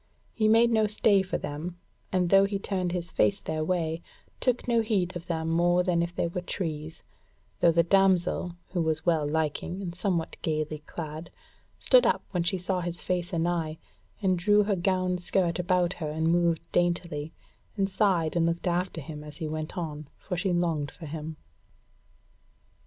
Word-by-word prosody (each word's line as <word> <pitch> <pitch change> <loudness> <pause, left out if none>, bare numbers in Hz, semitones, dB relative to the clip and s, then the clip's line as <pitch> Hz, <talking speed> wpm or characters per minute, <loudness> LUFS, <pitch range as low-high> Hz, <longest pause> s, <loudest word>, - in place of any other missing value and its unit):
He 215 -2 +2
made 230 +2 +5
no 220 -1 +3
stay 210 -1 +4
for 185 - -2
them, 165 +5 -5 0.3
and 180 -2 +1
though 195 0 +7
he 200 0 -1
turned 185 -3 -2
his 175 -1 -3
face 200 - +2
their 155 0 -3
way, 165 -1 -1 0.4
took 250 -1 0
no 235 -1 +3
heed 195 -6 0
of 175 0 -7
them 160 -2 -2
more 175 +2 +3
than 175 -2 +2
if 170 +1 -3
they - - 0
were 175 +2 -4
trees; 160 -4 -5 0.6
though 170 - +5
the 170 +1 +4
damsel, 180 -1 +2
who 180 -2 -1
was 160 -1 -1
well 160 -4 +2
liking 160 +4 -1
and 180 -4 -4
somewhat 175 -2 -1
gaily 155 -1 -2
clad, 160 0 -6 0.5
stood - - +5
up - - +1
when 180 - 0
she 180 +3 0
saw 185 +1 0
his 175 0 -4
face 180 -1 -1
anigh, 165 -2 0 0.5
and 185 -2 +2
drew 205 +3 +4
her 205 -1 +1
gown 185 0 0
skirt 175 -1 +1
about 180 0 +2
her 155 -3 -4
and 160 +2 0
moved 170 -1 +1
daintily, 170 -3 0 0.5
and 195 -1 +2
sighed 185 -5 +1
and 165 -1 +3
looked 170 +2 -2
after 175 -1 -1
him 150 0 -8
as 150 -1 -10
he 160 - -3
went 155 +3 -5
on, 155 -4 -4
for 180 - -5
she 180 +2 0
longed 165 -4 0
for 170 - -11
him. 155 +1 -6
175 Hz, 180 wpm, -28 LUFS, 160-185 Hz, 0.6 s, though